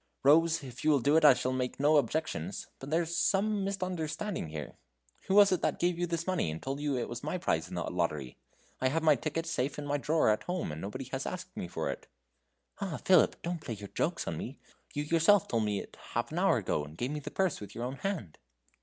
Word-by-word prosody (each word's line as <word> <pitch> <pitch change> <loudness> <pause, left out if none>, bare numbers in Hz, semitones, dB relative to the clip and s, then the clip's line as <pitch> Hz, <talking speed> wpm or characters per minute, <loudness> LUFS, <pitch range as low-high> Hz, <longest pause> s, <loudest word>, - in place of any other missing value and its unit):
"Rose, 160 +3 +5
if 125 -3 -9
you 155 - +3
will 145 -2 +5
do 145 +5 +3
it 160 - +5
I 150 - +9
shall 130 - -1
make 125 0 -2
no 150 +2 +5
objections. 120 - -1
But 135 - -8
there's 165 +2 0
some 205 +2 +2
misunderstanding 185 - -3
here. 75 -1 -6 0.5
Who 190 - +2
was 205 -1 +8
it 185 - +1
that - - 0
gave 175 0 +1
you 175 - 0
this 170 0 -2
money, 185 - 0
and 80 +1 -4
told 135 +6 -4
you 145 -3 0
it 120 - -2
was 120 0 -6
my 155 +5 -2
prize 80 - 0
in - - -6
the - - -1
lottery? 70 -5 -2 0.4
I 130 - +2
have 160 +5 0
my 155 -2 +6
ticket 155 +5 -3
safe 150 -5 -1
in 145 - -4
my 145 0 0
drawer 155 -1 +2
at 105 - +2
home, 180 - -3
and 75 +2 -6
nobody 115 +7 -5
has 135 0 -3
asked 185 0 -6
me - - -4
for 85 - -2
it." - - -9 0.7
"Ah! 190 -6 -3
Philip, 185 -4 +4
don't 170 -1 -3
play 115 - -5
your 100 -1 -9
jokes - - -1
on - - -2
me! - - -6 0.4
you 145 - 0
yourself 165 +5 +4
told 115 -2 +1
me 105 -1 0
it - - -9 0.2
half - - -1
an - - -2
hour - - +4
ago, 75 - -1
and 75 +2 -11
gave 125 +7 -2
me 150 - -3
the 145 - -6
purse 190 - 0
with 105 - -9
your 115 - -4
own 130 +2 -4
hand." 175 - -4
150 Hz, 245 wpm, -31 LUFS, 120-170 Hz, 0.7 s, I